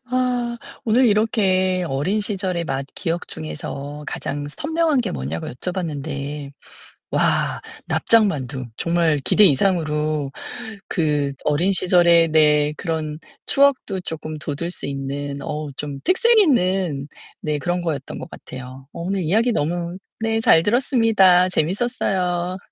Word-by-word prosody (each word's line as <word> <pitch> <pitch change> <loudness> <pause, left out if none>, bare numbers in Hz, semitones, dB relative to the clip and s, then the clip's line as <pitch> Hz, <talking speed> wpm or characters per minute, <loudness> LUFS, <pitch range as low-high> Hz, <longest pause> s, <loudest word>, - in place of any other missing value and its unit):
와 245 -2 0 0.3
오늘 240 +3 +4
이렇게 190 -4 +2
어린 160 +11 0
시절의 190 -4 -2
맛 135 -2 -2
기억 170 -2 -3
중에서 140 - -6
가장 145 +1 -4
선명한 310 - 0
게 230 - -2
뭐냐고 70 +5 -4
여쭤봤는데 145 -3 -4 0.6
와 - - +1 0.2
납작 225 -2 +4
만두 130 -6 -3
정말 170 -3 +2
기대 210 - +5
이상으로 155 -4 +2 0.6
그 150 -4 0
어린 165 +6 +2
시절의 175 -3 +4
네 150 -1 +4
그런 155 -2 -3 0.3
추억도 275 -9 +2
조금 155 -2 -6
돋울 150 +2 -4
수 - - -5
있는 140 +1 -4
어 150 0 -4
좀 145 -2 -5
특색 465 +5 +4
있는 185 - +2 0.3
네 150 -1 -1
그런 175 +4 -1
거였던 150 -5 -4
것 - - -8
같아요. 130 +1 -10
어 - - -9
오늘 190 +2 -1
이야기 220 +9 +2
너무 170 0 -2 0.2
네 225 0 0
잘 160 - +6
들었습니다. 220 -6 +4
재밌었어요. 180 -1 0
170 Hz, 260 characters per minute, -21 LUFS, 145-200 Hz, 0.6 s, 잘